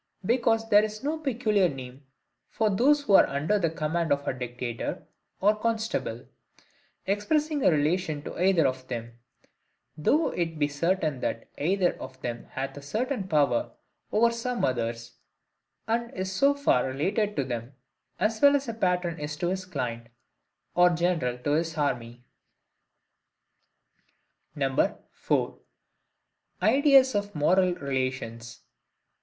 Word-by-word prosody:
Because 225 0 +2
there 205 0 +7
is 215 +2 -5
no 310 +3 -1
peculiar 220 - +1
name 130 0 -9 0.4
for 220 -2 +1
those 285 +9 +3
who 210 - +1
are - - +8
under 150 +9 0
the 170 -4 +1
command 160 +1 -2
of 140 0 0
a - - +1
dictator 125 -1 -5 0.3
or 210 +2 +4
constable, 225 +1 -2 0.8
expressing 290 +9 0
a - - +6
relation 155 -1 0
to - - -7
either 185 -5 +4
of 130 -1 -2
them; 120 -1 -6 0.8
though 290 - +2
it 165 -2 -3
be 145 -1 +2
certain 155 -1 -1
that 115 - -3
either 180 +4 +1
of 130 - -9
them 120 -1 -4
hath 135 0 -5
a - - -7
certain 215 - -2
power 145 -8 +1 0.4
over 235 +2 +4
some 235 +1 -2
others, 115 -1 -3 0.7
and 235 +1 0
so - - -16
is 190 0 -2
so 280 +9 +3
far 210 - +2
related 200 - -1
to 140 - 0
them, 120 0 -5 0.4
as 215 +3 0
well 285 0 +7
as 275 -1 -1
a 230 - -3
patron 180 -5 0
is 150 0 -5
to 175 +3 -1
his 185 0 -3
client, 125 -9 -4 0.7
or 180 0 +5
general 170 -8 0
to 135 +4 -2
his 160 +1 0
army. 120 -4 -2 2.9
4. - - -1 1.0
Ideas 265 +3 +5
of 205 -1 -2
Moral 180 +4 +3
relations. 130 -4 -4
175 Hz, 140 wpm, -27 LUFS, 135-215 Hz, 2.9 s, are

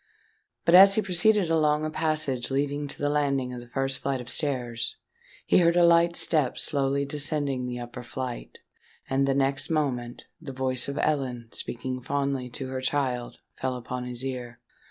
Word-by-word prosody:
But 170 - +4
as 195 +2 +9
he 220 - +3
proceeded 185 0 +2
along 155 -1 +2
a 155 - -3
passage 155 -6 0
leading 145 +2 -1
to - - -5
the 145 - -1
landing 140 -3 0
of 125 - -6
the 120 - -13
first 135 +2 -2
flight 135 -1 -1
of 125 -1 -8
stairs, 120 -5 -2 0.5
he - - +4
heard 170 -1 +4
a 175 -1 +6
light 170 0 +5
step 150 -8 +1
slowly 140 -1 0
descending 140 -3 -2
the 125 0 -4
upper 120 0 -7
flight; 125 0 -6 0.5
and 135 +1 +1
the 135 - +2
next 135 0 0
moment, 130 -6 -2 0.2
the 140 -4 -7
voice 130 -1 -1
of 140 +1 -4
Ellen 130 -7 -1
speaking 130 +1 -5
fondly 140 -1 -2
to 130 +1 -6
her 130 0 -3
child, 130 -3 -1 0.2
fell 130 -1 -1
upon 125 0 -5
his 125 +1 -1
ear. 125 -2 -5
135 Hz, 175 wpm, -27 LUFS, 125-150 Hz, 0.5 s, as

